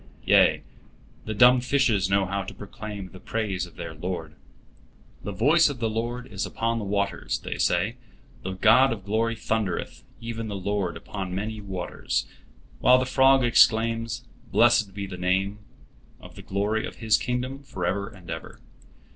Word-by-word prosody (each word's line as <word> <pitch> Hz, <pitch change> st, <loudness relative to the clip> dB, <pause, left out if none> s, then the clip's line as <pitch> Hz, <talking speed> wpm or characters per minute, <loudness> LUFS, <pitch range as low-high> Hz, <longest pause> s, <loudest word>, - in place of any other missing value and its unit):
Yea, -, -, +5 dB, 0.6 s
the 110 Hz, -, -3 dB
dumb 125 Hz, +3 st, +6 dB
fishes 120 Hz, -8 st, +2 dB
know 100 Hz, 0 st, +3 dB
how 100 Hz, +1 st, -2 dB
to 95 Hz, -, -8 dB
proclaim 105 Hz, -1 st, -8 dB
the 95 Hz, -, -12 dB
praise 95 Hz, -5 st, -2 dB
of 85 Hz, -, -18 dB
their 85 Hz, -1 st, -6 dB
Lord. 80 Hz, -1 st, -5 dB, 0.9 s
"The 100 Hz, -, -5 dB
voice 150 Hz, -, +4 dB
of 140 Hz, -, -5 dB
the 115 Hz, -2 st, -1 dB
Lord 120 Hz, +3 st, -3 dB
is 105 Hz, -6 st, -4 dB
upon 115 Hz, 0 st, -1 dB
the 105 Hz, -, -4 dB
waters," 100 Hz, -2 st, -1 dB
they -, -, -6 dB
say, -, -, +1 dB, 0.4 s
"the 95 Hz, -, -4 dB
God 115 Hz, +7 st, +5 dB
of 100 Hz, -4 st, -5 dB
glory 115 Hz, +2 st, 0 dB
thundereth, 110 Hz, -4 st, -2 dB, 0.2 s
even 115 Hz, -1 st, -5 dB
the 105 Hz, -, -4 dB
Lord 100 Hz, -2 st, -2 dB
upon 95 Hz, -3 st, -6 dB
many 105 Hz, +2 st, -4 dB
waters"; 90 Hz, -9 st, -3 dB, 0.5 s
while 125 Hz, 0 st, +6 dB
the 130 Hz, -, 0 dB
frog 135 Hz, 0 st, +4 dB
exclaims, 115 Hz, 0 st, +3 dB, 0.3 s
"Blessed 110 Hz, -4 st, +4 dB
be 100 Hz, -1 st, -4 dB
the 95 Hz, -2 st, -7 dB
name 95 Hz, +3 st, 0 dB, 0.6 s
of -, -, -13 dB
the -, -, -10 dB
glory 105 Hz, +3 st, -1 dB
of -, -, -10 dB
His 110 Hz, -2 st, +2 dB
kingdom 125 Hz, +2 st, -2 dB
forever 100 Hz, -5 st, -3 dB
and 95 Hz, -6 st, -16 dB
ever." 80 Hz, -1 st, -7 dB
105 Hz, 165 wpm, -26 LUFS, 95-115 Hz, 0.9 s, dumb